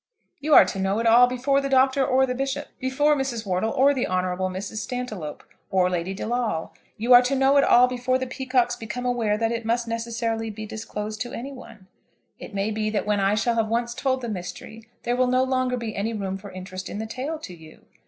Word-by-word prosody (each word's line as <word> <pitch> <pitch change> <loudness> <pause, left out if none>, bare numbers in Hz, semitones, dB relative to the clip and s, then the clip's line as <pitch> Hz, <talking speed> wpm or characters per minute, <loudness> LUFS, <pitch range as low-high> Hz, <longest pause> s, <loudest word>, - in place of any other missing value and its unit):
You 300 +1 +3
are - - +9
to 190 +1 -4
know 195 +2 0
it 230 - -1
all 235 +2 +7
before 265 +3 +1
the 275 - -3
Doctor 265 0 +4
or 265 0 +3
the 250 - -2
Bishop, 270 +3 -3
before 290 +4 +2
Mrs. 260 -5 -3
Wortle 185 +3 0
or 280 +3 +4
the 260 -2 -1
Hon. 185 0 0 0.3
Mrs. 195 +3 -6
Stantiloup, 215 - -5 0.3
or 185 -1 +2
Lady 180 +2 -2
De - - -6
Lawle. 235 -8 -2 0.2
You 235 +4 +3
are 245 - +10
to 255 +2 0
know 270 +1 +4
it 280 - +6
all 245 +1 +6
before 250 +1 0
the 260 - -3
Peacockes 255 -1 0
become 235 +3 -6
aware 230 -4 +1
that 225 +1 0
it 230 0 -3
must 235 +1 0
necessarily 230 -1 -2
be 215 0 -7
disclosed 215 0 -6
to 240 - -4
any 265 +4 -6
one. 230 -7 -12 0.5
It 210 - -9
may 200 +2 0
be 215 0 -1
that 215 -1 -1
when 210 -1 +1
I 195 +1 +2
shall 235 +2 +1
have 225 -1 +1
once 235 +2 -1
told 260 +1 -1
the 240 - -4
mystery 205 +4 -7
there 240 - 0
will 255 0 +2
no 255 +1 +3
longer 255 -1 0
be 230 -3 -5
any 220 +3 -2
room 195 -3 -3
for 200 +1 -10
interest 185 0 -7
in - - -5
the 220 - -3
tale 260 +8 -4
to 205 -12 -9
you. 160 -1 -16
235 Hz, 230 wpm, -24 LUFS, 210-255 Hz, 0.5 s, are